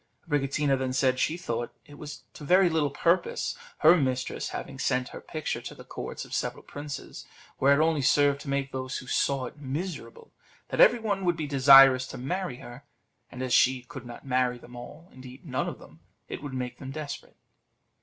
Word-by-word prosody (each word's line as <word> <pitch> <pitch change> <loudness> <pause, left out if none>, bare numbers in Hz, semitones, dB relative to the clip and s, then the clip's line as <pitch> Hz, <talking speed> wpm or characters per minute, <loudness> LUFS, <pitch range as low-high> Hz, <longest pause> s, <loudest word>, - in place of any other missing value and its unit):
Abricotina 145 -1 +1
then 130 -1 -2
said 130 0 +2
she 160 +5 +1
thought 120 -9 -4
it 145 - -15
was 150 -1 -8
to - - -11
very 180 +4 +4
little 155 -3 +1
purpose 170 +5 0 0.3
her 160 +3 +8
mistress 130 -5 -1
having 135 -1 -7
sent 125 -1 0
her - - -9
picture 155 -2 -4
to - - -8
the - - -12
courts - - -7
of - - -12
several - - -2
princes, 145 -1 -8 0.3
where 140 +1 +5
it 155 - +5
only 160 -3 +1
served 140 +1 +3
to 140 - -8
make 140 0 -1
those 130 -1 -4
who - - -8
saw 135 +1 0
it 135 - -10
miserable; 175 - -6 0.4
that - - +1
every 240 - +7
one 205 -4 -2
would 175 -2 +1
be 155 - -2
desirous 135 -2 +7
to - - -8
marry 175 +3 -3
her, 120 +2 -11 0.5
and 125 - -6
as 125 -1 -1
she 130 0 +4
could 125 -1 -10
not 120 - -10
marry 125 -2 +1
them 120 0 -14
all, 135 +8 -10
indeed 130 +3 -12
none 130 -5 -2
of - - -8
them, - - -16 0.3
it - - -6
would 140 -2 -6
make 125 -1 -4
them 135 - -7
desperate. 145 0 -7
140 Hz, 200 wpm, -27 LUFS, 130-155 Hz, 0.5 s, her